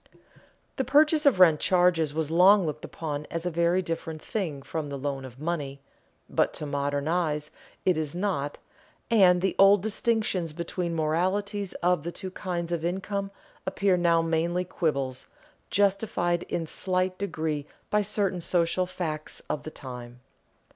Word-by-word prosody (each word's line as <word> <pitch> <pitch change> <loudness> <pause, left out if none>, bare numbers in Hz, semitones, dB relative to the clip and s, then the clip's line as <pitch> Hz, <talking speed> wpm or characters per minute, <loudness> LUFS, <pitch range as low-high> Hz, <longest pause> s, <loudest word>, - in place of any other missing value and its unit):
The 265 - +1
purchase 300 +3 +4
of 245 -10 +4
rent 165 -5 +7
charges 175 -4 +3
was 155 0 -2
long 185 +3 +6
looked 150 -1 -4
upon 150 -2 -5
as 165 +1 -4
a 180 - 0
very 170 +3 +2
different 165 -1 -4
thing 155 -8 -4
from 155 -1 -4
the 140 - -4
loan 135 -1 -3
of 130 0 -12
money, 150 -4 -3 0.5
but - - +1
to 150 - -3
modern 145 0 -1
eyes 155 -3 0 0.3
it 180 -4 +3
is 155 0 -3
not, 175 -7 -1 0.5
and 185 -5 +6
the 190 - +1
old 195 0 +7
distinctions 210 -6 0
between 170 +1 -3
the 160 -1 0
moralities 195 +5 0
of 180 -2 +3
the 170 +3 -4
two 185 +1 -6
kinds 175 -2 -4
of 170 -2 -1
income 195 +3 -2 0.4
appear 190 0 +2
now 170 -2 +3
mainly 170 +2 0
quibbles, 140 -7 -2 0.4
justified 195 -4 +1
in 170 - -1
a - - -6
slight 185 +2 -1
degree 155 -7 -2 0.2
by 210 - +3
certain 200 -3 0
social 175 +1 +1
facts 155 -4 -4
of 150 - -2
the - - -7
time. 125 -4 -9
170 Hz, 160 wpm, -27 LUFS, 155-185 Hz, 0.5 s, rent